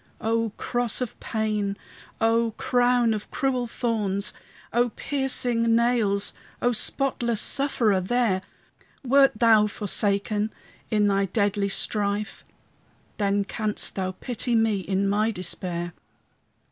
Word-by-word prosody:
O 225 Hz, 0 st, 0 dB
cross 240 Hz, -2 st, -1 dB
of 250 Hz, -3 st, -3 dB
pain! 210 Hz, -3 st, -2 dB, 0.4 s
O 230 Hz, 0 st, +2 dB
crown 245 Hz, -2 st, +2 dB
of 215 Hz, -1 st, -5 dB
cruel 255 Hz, -3 st, -1 dB
thorns! 210 Hz, -4 st, -2 dB, 0.4 s
O 240 Hz, +1 st, +2 dB
piercing 245 Hz, -3 st, +1 dB
nails! 230 Hz, -4 st, +1 dB, 0.3 s
O 245 Hz, -, +2 dB
spotless 240 Hz, -1 st, +1 dB
Sufferer 235 Hz, -8 st, +2 dB
there! 205 Hz, -1 st, +1 dB, 0.6 s
Wert 270 Hz, +1 st, +5 dB
thou 220 Hz, -2 st, +5 dB
forsaken 205 Hz, +1 st, 0 dB, 0.4 s
in 210 Hz, -1 st, +2 dB
thy 200 Hz, -1 st, +2 dB
deadly 200 Hz, 0 st, 0 dB
strife? 205 Hz, +1 st, -1 dB, 0.8 s
Then 200 Hz, 0 st, +1 dB
canst 210 Hz, +1 st, -3 dB
thou 185 Hz, -1 st, -3 dB
pity 240 Hz, +2 st, -2 dB
me 225 Hz, -3 st, +2 dB
in 195 Hz, +1 st, -1 dB
my 210 Hz, +2 st, +1 dB
despair. 175 Hz, -3 st, -4 dB
220 Hz, 110 wpm, -25 LUFS, 200-240 Hz, 0.8 s, Wert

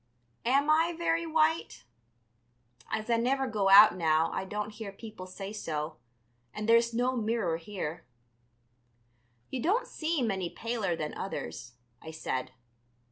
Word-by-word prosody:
Am 275 Hz, +3 st, +3 dB
I 325 Hz, +2 st, +3 dB
very 335 Hz, 0 st, 0 dB
white? 320 Hz, 0 st, +1 dB, 1.1 s
As 215 Hz, -, -2 dB
I 230 Hz, -, +4 dB
never 265 Hz, +3 st, +1 dB
go 210 Hz, -5 st, 0 dB
out 205 Hz, +2 st, +9 dB
now 160 Hz, -2 st, +2 dB
I 190 Hz, -, -3 dB
don't 210 Hz, +2 st, -4 dB
hear 210 Hz, -1 st, -7 dB
people 200 Hz, -2 st, -10 dB
say 195 Hz, +2 st, -7 dB
so, 155 Hz, -, -4 dB, 0.6 s
and 210 Hz, -, -4 dB
there's 230 Hz, +1 st, +5 dB
no 245 Hz, +2 st, 0 dB
mirror 220 Hz, -7 st, 0 dB
here." 170 Hz, -2 st, -5 dB, 1.5 s
"You 255 Hz, -, -3 dB
don't 440 Hz, -, +2 dB
seem 315 Hz, -, -1 dB
any 190 Hz, -3 st, -2 dB
paler 225 Hz, -6 st, -2 dB
than 155 Hz, -2 st, -4 dB
others," 115 Hz, +10 st, -6 dB, 0.3 s
I 160 Hz, -, -9 dB
said. 145 Hz, -5 st, -3 dB
215 Hz, 135 wpm, -30 LUFS, 185-265 Hz, 1.5 s, out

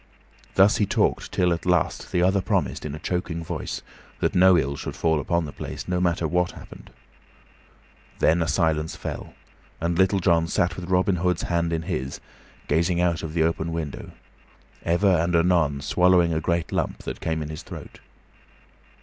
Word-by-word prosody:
Thus 95 Hz, +2 st, +5 dB
he 105 Hz, -, +1 dB
talked -, -, 0 dB
till, 90 Hz, -1 st, +2 dB
at 85 Hz, -, -4 dB
last, 90 Hz, -3 st, 0 dB
the 90 Hz, -, +2 dB
other 95 Hz, +1 st, +3 dB
promised, 85 Hz, -, -1 dB
in 75 Hz, -, -5 dB
a -, -, -8 dB
choking 90 Hz, -1 st, -3 dB
voice, -, -, -5 dB, 0.4 s
that -, -, 0 dB
no 90 Hz, 0 st, +6 dB
ill 70 Hz, -3 st, 0 dB
should -, -, -6 dB
fall 80 Hz, -2 st, +1 dB
upon 85 Hz, +3 st, 0 dB
the 70 Hz, -, -7 dB
place, -, -, -7 dB
no 90 Hz, 0 st, 0 dB
matter 85 Hz, -2 st, +1 dB
what 90 Hz, +2 st, 0 dB
happened. -, -, -12 dB, 1.3 s
Then 85 Hz, +2 st, +3 dB
a 80 Hz, -, 0 dB
silence 80 Hz, -3 st, 0 dB
fell, -, -, -7 dB, 0.4 s
and 85 Hz, +1 st, -1 dB
Little 95 Hz, +1 st, +4 dB
John 85 Hz, -3 st, +2 dB
sat 85 Hz, +3 st, 0 dB
with 90 Hz, 0 st, -7 dB
Robin 90 Hz, 0 st, +2 dB
Hood's 90 Hz, +1 st, 0 dB
hand 85 Hz, -1 st, 0 dB
in 80 Hz, -1 st, -1 dB
his, 70 Hz, -6 st, -4 dB, 0.5 s
gazing 85 Hz, +3 st, +1 dB
out 85 Hz, -2 st, +1 dB
of 80 Hz, 0 st, -6 dB
the 80 Hz, -, +3 dB
open 85 Hz, 0 st, -1 dB
window, 80 Hz, -4 st, -5 dB, 0.7 s
ever 85 Hz, +4 st, +1 dB
and 85 Hz, +2 st, +1 dB
anon 85 Hz, -5 st, +2 dB
swallowing 90 Hz, +2 st, +3 dB
a 80 Hz, -, -1 dB
great 85 Hz, 0 st, -1 dB
lump -, -, -2 dB
that -, -, -6 dB
came 80 Hz, -1 st, -1 dB
in 75 Hz, -, -7 dB
his 75 Hz, -, -6 dB
throat. -, -, -10 dB
85 Hz, 180 wpm, -24 LUFS, 80-90 Hz, 1.3 s, no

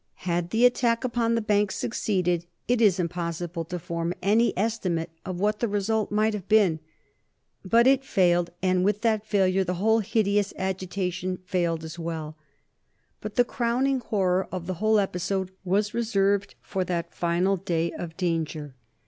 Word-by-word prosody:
Had 175 Hz, -1 st, 0 dB
the 225 Hz, +6 st, +3 dB
attack 240 Hz, -1 st, +2 dB
upon 235 Hz, -2 st, +1 dB
the 230 Hz, -, 0 dB
Bank 205 Hz, -1 st, +2 dB
succeeded 180 Hz, -7 st, -1 dB, 0.2 s
it 245 Hz, -1 st, +2 dB
is 200 Hz, -5 st, +4 dB
impossible 170 Hz, 0 st, -3 dB
to 180 Hz, +2 st, -4 dB
form 170 Hz, 0 st, -3 dB
any 220 Hz, +5 st, +3 dB
estimate 185 Hz, -6 st, -1 dB, 0.2 s
of 185 Hz, -1 st, -4 dB
what 210 Hz, +2 st, +1 dB
the 235 Hz, -, +1 dB
result 210 Hz, +1 st, 0 dB
might 215 Hz, +1 st, +2 dB
have 200 Hz, -2 st, -6 dB
been. 200 Hz, -7 st, +4 dB, 0.8 s
But 230 Hz, +5 st, +4 dB
it 270 Hz, 0 st, +4 dB
failed, 175 Hz, -7 st, +2 dB
and 185 Hz, -1 st, +2 dB
with 205 Hz, +1 st, +1 dB
that 220 Hz, -2 st, +1 dB
failure 190 Hz, -2 st, +2 dB
the 180 Hz, 0 st, -2 dB
whole 220 Hz, +5 st, +3 dB
hideous 205 Hz, -1 st, +1 dB
agitation 185 Hz, -1 st, -2 dB
failed 170 Hz, -4 st, -1 dB
as 160 Hz, +2 st, -8 dB
well. 160 Hz, -2 st, -5 dB, 0.8 s
But 210 Hz, 0 st, -7 dB
the 245 Hz, -, +4 dB
crowning 255 Hz, +3 st, 0 dB
horror 190 Hz, -5 st, 0 dB
of 180 Hz, -2 st, -4 dB
the 185 Hz, -, -2 dB
whole 215 Hz, 0 st, +4 dB
episode 190 Hz, -1 st, -1 dB
was 205 Hz, +3 st, 0 dB
reserved 205 Hz, -3 st, +1 dB
for 190 Hz, -, -2 dB
that 170 Hz, -2 st, -3 dB
final 175 Hz, +3 st, +1 dB
day 170 Hz, -3 st, -1 dB
of 165 Hz, -2 st, -7 dB
danger. 160 Hz, -5 st, -2 dB
190 Hz, 160 wpm, -26 LUFS, 175-215 Hz, 0.8 s, is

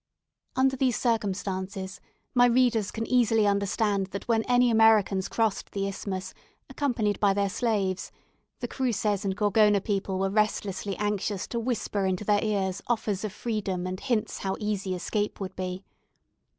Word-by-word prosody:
Under 265 Hz, 0 st, +3 dB
these 255 Hz, -2 st, +1 dB
circumstances, 190 Hz, -4 st, -2 dB, 0.3 s
my 245 Hz, -1 st, +6 dB
readers 235 Hz, -4 st, +3 dB
can 225 Hz, 0 st, -4 dB
easily 225 Hz, -3 st, +3 dB
understand 200 Hz, 0 st, +1 dB
that 200 Hz, +1 st, -7 dB
when 230 Hz, -2 st, +3 dB
any 245 Hz, -1 st, +4 dB
Americans 220 Hz, -4 st, +4 dB
crossed 220 Hz, -4 st, -1 dB
the 195 Hz, -1 st, -1 dB
Isthmus, 190 Hz, -1 st, -5 dB, 0.4 s
accompanied 240 Hz, -7 st, 0 dB
by 200 Hz, -2 st, +3 dB
their 200 Hz, -1 st, +1 dB
slaves, 195 Hz, -4 st, -1 dB, 0.5 s
the -, -, -2 dB
Cruces 215 Hz, -6 st, -1 dB
and 195 Hz, -1 st, -2 dB
Gorgona 210 Hz, 0 st, +4 dB
people 195 Hz, -1 st, -2 dB
were 195 Hz, 0 st, 0 dB
restlessly 205 Hz, -2 st, 0 dB
anxious 205 Hz, -1 st, -1 dB
to 235 Hz, -, -2 dB
whisper 220 Hz, -4 st, -1 dB
into 185 Hz, +2 st, -1 dB
their 205 Hz, 0 st, +3 dB
ears 195 Hz, -3 st, -1 dB
offers 215 Hz, -4 st, -1 dB
of 215 Hz, -, -3 dB
freedom 205 Hz, -5 st, -3 dB
and 185 Hz, 0 st, -4 dB
hints 235 Hz, -5 st, -1 dB
how 190 Hz, -1 st, -2 dB
easy 200 Hz, -3 st, -2 dB
escape 205 Hz, +4 st, -2 dB
would 195 Hz, -2 st, -5 dB
be. 185 Hz, +1 st, -4 dB
205 Hz, 150 wpm, -27 LUFS, 195-225 Hz, 0.5 s, my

